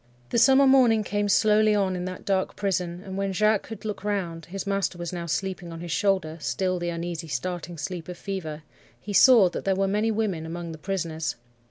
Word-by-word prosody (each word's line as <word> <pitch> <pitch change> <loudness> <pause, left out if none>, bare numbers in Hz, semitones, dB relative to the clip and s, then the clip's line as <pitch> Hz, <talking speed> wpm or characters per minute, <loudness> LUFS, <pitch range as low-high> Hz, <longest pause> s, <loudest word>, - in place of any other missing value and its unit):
"The - - +2
summer 270 +3 +6
morning 250 -5 +5
came 205 0 -1
slowly 215 +1 +4
on 195 -2 +1
in 180 0 -3
that 185 0 -7
dark 190 -1 0
prison, 180 -3 -2
and 190 0 -6
when 195 0 -1
Jacques 215 +2 +3
could 220 -1 -10
look 210 -2 -4
round—his 190 -2 -3
master 195 -2 -1
was 175 0 -5
now 170 -1 -4
sleeping 180 +2 -3
on 165 - -7
his 170 0 -6
shoulder, 170 -4 0
still 185 +1 -1
the 175 0 -2
uneasy, 170 -1 -4
starting 170 +4 -4
sleep 175 +1 -5
of 180 - -6
fever—he 170 +1 -7
saw 230 -2 +7
that - - -5
there 195 -1 +1
were 195 +1 +1
many 210 +3 +1
women 210 -7 -1
among 170 +1 -6
the 160 - -9
prisoners. 165 -3 -3
190 Hz, 200 wpm, -26 LUFS, 170-205 Hz, -, saw